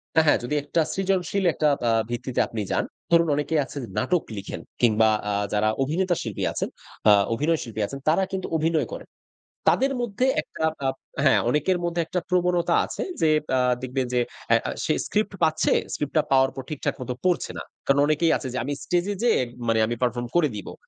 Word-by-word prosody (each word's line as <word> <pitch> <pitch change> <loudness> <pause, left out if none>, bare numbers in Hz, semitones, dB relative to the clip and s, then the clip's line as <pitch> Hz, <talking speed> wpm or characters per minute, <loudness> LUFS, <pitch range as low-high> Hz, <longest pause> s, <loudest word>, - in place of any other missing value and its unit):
হ্যাঁ, 160 0 +5
হ্যাঁ, - - +5
যদি 125 +5 -2
একটা 150 +3 +1
সৃজনশীল, 195 0 0
একটা 150 - +1 0.2
আ - - +4 0.2
ভিত্তিতে 120 +1 -3
আপনি 110 - -4
যান। - - +1 0.3
ধরুন, 170 0 +5
অনেকেই 150 +2 0
আছে 145 - -10 0.2
নাটক 165 +7 +1
লিখেন 100 - -6 0.2
কিংবা 110 -2 +4 0.2
আ - - 0 0.2
যারা 105 +1 +2
অভিনেতা 175 +6 0
শিল্পী 110 -4 -4
আছেন, - - -2 0.4
আ - - +9 0.2
অভিনয় 155 +7 +1
শিল্পী 110 -3 -5
আছেন, 140 - -7
তারা 165 +5 +3
কিন্তু 190 -1 -3
অভিনয় 160 0 +1
করেন। - - -8 0.6
তাদের 270 +1 +2
মধ্যে 240 +1 0 0.2
একটা 160 - -7 0.2
আপ 130 - -1 0.3
হ্যাঁ, - - +5
অনেকের 150 +8 +2
মধ্যে 170 0 -1
একটা 180 - -2
প্রবণতা 180 -1 +2
আছে - - -4 0.2
যে, 160 - +4 0.3
আ - - +3 0.2
দেখবেন 130 0 -2
যে, 125 - +3 0.3
অ্যা - - +6
আ - - -1
সে - - +2
স্ক্রিপ্ট 210 -1 -1
পাচ্ছে, 160 -1 +3 0.2
স্ক্রিপ্ট 145 -2 -3
টা 155 - +4
পাওয়ার 135 0 +4
পর 135 - -4
ঠিকঠাক 150 -3 -2
মতো 125 0 -3
পড়ছে 180 -1 +1
না। - - -5 0.2
কারণ 140 0 +4
অনেকেই 155 +2 +2
আছে 135 - -6
যে, - - -2
"আমি 145 +3 -2
স্টেজ 175 0 0
এ - - -6
যেয়ে 240 - +4 0.3
মানে 115 0 +3
আমি 120 - -2
পারফর্ম 120 -1 0
করে 165 -4 +4
দিবো"। 105 - -7
150 Hz, 200 wpm, -25 LUFS, 125-175 Hz, 0.6 s, আ